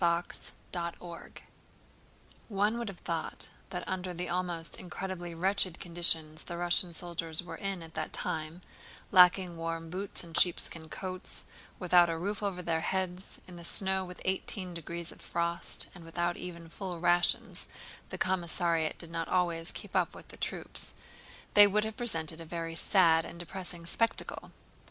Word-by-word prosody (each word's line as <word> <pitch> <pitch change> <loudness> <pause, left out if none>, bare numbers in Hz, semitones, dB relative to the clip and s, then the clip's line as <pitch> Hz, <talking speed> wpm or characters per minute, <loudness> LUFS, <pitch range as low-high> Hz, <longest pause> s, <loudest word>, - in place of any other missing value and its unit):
CHAPTER 170 0 0 0.2
VIII 170 -1 -5 1.1
One 210 +3 +2
would 235 - -3
have 190 - -9
thought 165 -2 -3 0.2
that 180 -1 -4
under 185 -1 -2
the 180 +1 -3
almost 175 -2 -1
incredibly 180 -1 -5
wretched 185 0 +1
conditions 165 -3 +1
the 170 - -5
Russian 175 0 +4
soldiers 165 -1 0
were 170 -1 -7
in 195 -3 -3
at 165 0 -11
that 155 0 -3
time—lacking 180 +2 +2
warm 165 0 -3
boots 190 +1 -1
and 165 -1 -10
sheepskin 165 -2 +3
coats, 185 +1 -6 0.3
without 175 -1 +6
a 165 - -1
roof 200 +5 -2
over 190 -3 -2
their 165 -1 +1
heads, 185 +1 -2
in 180 -1 -10
the 170 - -9
snow 190 +2 +2
with 180 -1 -8
eighteen 185 -1 -1
degrees 170 0 -2
of - - -14
frost, 170 0 0
and 175 - -11
without 175 +1 -1
even 170 -2 -7
full 175 +1 -5
rations 175 0 +3 0.4
(the - - -5
commissariat 170 -3 +1
did 170 -1 -6
not 165 -1 -2
always 170 -2 +2
keep - - -7
up - - +2
with - - -12
the - - -10
troops)—they 205 0 +1
would 210 +1 +2
have 220 0 -3
presented 165 -10 -2
a - - -7
very 165 0 -4
sad 165 -3 +5
and 170 - -9
depressing 175 -1 -3
spectacle. 230 +6 0
175 Hz, 155 wpm, -32 LUFS, 165-185 Hz, 1.1 s, without